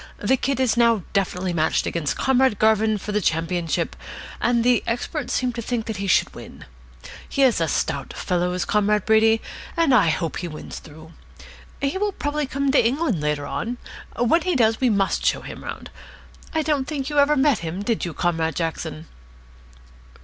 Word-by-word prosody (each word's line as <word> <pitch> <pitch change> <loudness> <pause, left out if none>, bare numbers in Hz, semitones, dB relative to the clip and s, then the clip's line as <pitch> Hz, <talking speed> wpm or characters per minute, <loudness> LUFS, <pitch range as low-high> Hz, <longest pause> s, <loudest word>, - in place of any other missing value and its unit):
The 210 +6 +2
Kid 265 0 -1
is 255 -3 +2
now 230 -4 +3
definitely 185 -2 0
matched 160 -1 +1
against 160 -4 -2
Comrade 265 -4 +2
Garvin 220 0 +3
for 210 - -6
the 210 0 0
championship, 165 0 -1 0.5
and 240 -1 +2
the 245 0 +3
experts 245 +4 -3
seem 250 -1 0
to 235 - -4
think 230 -1 -2
that 220 -3 -4
he 200 +1 -3
should 180 - +2
win. - - -11 0.6
He 275 - +1
is 245 -9 +3
a 165 - +2
stout 140 -2 -2
fellow, 180 0 -1
is 180 - -1
Comrade 210 -1 +1
Brady, 220 0 +4 0.4
and 330 -5 +3
I 205 -9 +5
hope 160 +1 -2
he 175 - -4
wins 155 -2 -8
through. 160 +1 -14 0.7
He 280 +7 0
will 415 0 0
probably 290 -2 -2
come 275 +1 0
to 270 - +4
England 245 - 0
later 150 -1 -1
on. 225 - -3 0.4
When 245 +9 +3
he 360 0 0
does, 225 -2 +2
we 255 - +4
must 200 -3 +1
show - - +1
him - - -9
round. - - -7 0.6
I 320 -1 0
don't 290 -3 0
think 290 -2 -3
you 295 - +2
ever 290 +1 +4
met 270 -4 +3
him, 170 +4 -4
did 230 +1 -1
you, 170 -3 -4
Comrade 165 -3 0
Jackson?" 160 -2 -4
220 Hz, 185 wpm, -23 LUFS, 175-265 Hz, 0.7 s, I